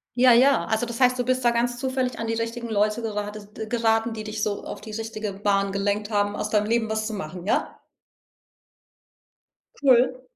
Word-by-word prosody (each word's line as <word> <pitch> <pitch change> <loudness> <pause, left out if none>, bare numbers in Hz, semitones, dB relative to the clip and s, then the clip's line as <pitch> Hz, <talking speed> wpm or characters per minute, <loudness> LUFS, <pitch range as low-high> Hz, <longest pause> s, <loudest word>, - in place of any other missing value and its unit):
Ja, 250 0 +6
ja. 265 +4 +5
Also 220 +2 0
das 235 +1 -6
heißt, 255 0 +4
du 245 - 0
bist 255 0 0
da 240 - +5
ganz 240 +1 0
zufällig 260 -1 -2
an 230 - -3
die 225 - -1
richtigen 230 +1 -3
Leute 215 +1 +1
gerade 210 -1 -4
d 215 +1 -8
geraten, 225 0 +1
die 215 -1 -6
dich 215 0 -4
so 205 -1 -2
auf - - -7
die 220 - -10
richtige 220 -1 -4
Bahn 200 0 0
gelenkt 205 +2 -1
haben, 205 -1 +1
aus 210 - -3
deinem 210 -1 +2
Leben 225 0 +1
was 220 0 -1
zu 220 - -4
machen, 180 -1 -6
ja? - - -1 2.0
Cool. 255 -1 +4
225 Hz, 195 wpm, -24 LUFS, 210-240 Hz, 2.0 s, Ja